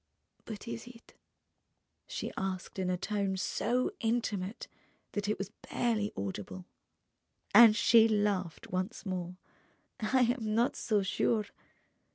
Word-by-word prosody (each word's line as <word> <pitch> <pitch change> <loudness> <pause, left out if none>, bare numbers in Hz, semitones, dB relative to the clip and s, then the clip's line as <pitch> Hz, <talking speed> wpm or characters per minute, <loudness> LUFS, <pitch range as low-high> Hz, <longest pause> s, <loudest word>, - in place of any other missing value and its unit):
"But 215 0 -8
is 230 +1 -6
it?" 240 -1 -14 0.9
she - - -4
asked 190 0 -4
in 185 -1 0
a 180 - +1
tone 195 0 -1
so 245 - 0
intimate 225 -4 -1 0.4
that 205 -1 -2
it 215 - 0
was 195 +1 -5 0.2
barely 220 -4 0
audible. 95 -2 -5 0.9
And 220 0 +9
she 230 0 +6
laughed 205 -5 -1
once 185 +5 -3
more. 180 -2 -3 0.6
"I 255 +4 +2
am 235 -3 +1
not 235 +2 +2
so 210 -3 +1
sure 210 +3 +1
210 Hz, 125 wpm, -32 LUFS, 190-230 Hz, 0.9 s, And